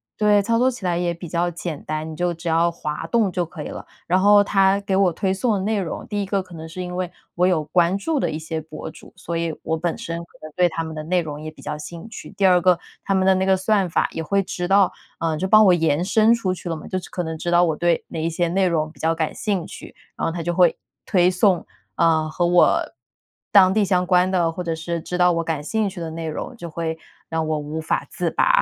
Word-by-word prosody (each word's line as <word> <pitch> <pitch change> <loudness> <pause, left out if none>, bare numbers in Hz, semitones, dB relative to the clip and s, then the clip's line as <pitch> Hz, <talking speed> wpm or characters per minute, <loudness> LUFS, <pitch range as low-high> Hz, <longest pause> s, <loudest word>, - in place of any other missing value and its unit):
对， 210 -1 +3
操 230 +2 +1
作 255 +1 +4
起 240 -6 -7
来 175 -1 +1
也 175 0 0
比 170 +1 -7
较 170 +2 0
简 170 -3 -6
单， 155 +1 -3
你 160 - -7
就 175 +2 0
只 165 +1 -8
要 165 +1 +3
滑 150 -3 -5
动 225 -5 +2
就 180 0 -1
可 160 -2 -8
以 - - -6
了。 - - -8 0.2
然 180 +2 +2
后 205 0 +6
它 195 -1 +3
给 195 -1 -1
我 190 -2 +4
推 190 +3 -1
送 220 +4 0
的 - - -1
内 210 +2 0
容， 180 -4 -4
第 205 -1 -2
一 - - -2
个 195 0 -1
可 185 -1 -15
能 160 -1 -8
是 180 +3 -6
因 180 0 -6
为 180 -1 -3 0.2
我 180 +1 +2
有 170 -5 +2
关 175 +4 +2
注 295 +9 -1
的 - - 0
一 155 - -3
些 160 0 -4
博 155 0 -8
主， - - -15
所 170 -2 -5
以 165 -1 -2
我 160 - 0
本 165 +1 -2
身 165 0 -5
可 170 - -13
能 155 - -8
对 180 -1 +3
他 165 0 -3
们 160 0 -6
的 155 - -4
内 180 +3 +1
容 150 -2 -6
也 155 - -6
比 155 - -15
较 - - -3
兴 165 +5 -8
趣， 225 - -9
第 195 - +2
二 180 -1 +5
个， 180 -1 +4 0.3
他 195 - 0
们 190 0 +2
的 190 - +6
那 190 0 +1
个 190 0 +4
算 195 -1 +1
法 - - +1
也 - - -4
会 195 +5 +1
知 180 -1 -4
道， 195 0 +4 0.2
呃， 165 -1 -1
就 185 +5 -2
帮 215 +2 +7
我 185 - +6
延 165 -1 +1
伸 220 +3 +4
出 195 -6 -1
去 180 -1 -7
了 165 - -1
嘛， 155 - -9
就 185 - -2
是 - - -11
可 185 -4 -3
能 160 -1 -4
知 175 - -3
道 175 0 +5
我 160 -3 +1
对 170 +1 +1
哪 160 - -4
一 165 - 0
些 170 +1 0
内 190 +2 +2
容 155 -3 0
比 - - -21
较 165 +1 +1
感 160 -1 -2
兴 195 -6 -2
趣， - - -11 0.2
然 - - -6
后 - - +1
他 170 0 -4
就 175 +1 -1
会 175 -1 +4 0.3
推 180 -1 +4
送， 185 -1 +2 0.3
啊， 160 -2 +3
和 175 +3 0
我 175 0 +4 0.7
当 190 -2 +6
地 215 0 +3
相 180 -2 +1
关 180 0 +3
的， 175 -3 +1
或 180 +2 -5
者 165 -1 -2
是 165 +1 -4
知 180 - -4
道 180 0 +5
我 165 -1 0
感 160 -3 -3
兴 220 +4 0
趣 190 -1 -9
的 165 -1 -5
内 165 0 -5
容， 155 +10 -5
就 175 -7 -8
会 160 0 -3 0.3
让 160 -1 -1
我 155 0 0
无 150 +2 -4
法 160 - -1
自 - - -2
拔， - - +3
175 Hz, 300 characters per minute, -22 LUFS, 160-190 Hz, 0.7 s, 帮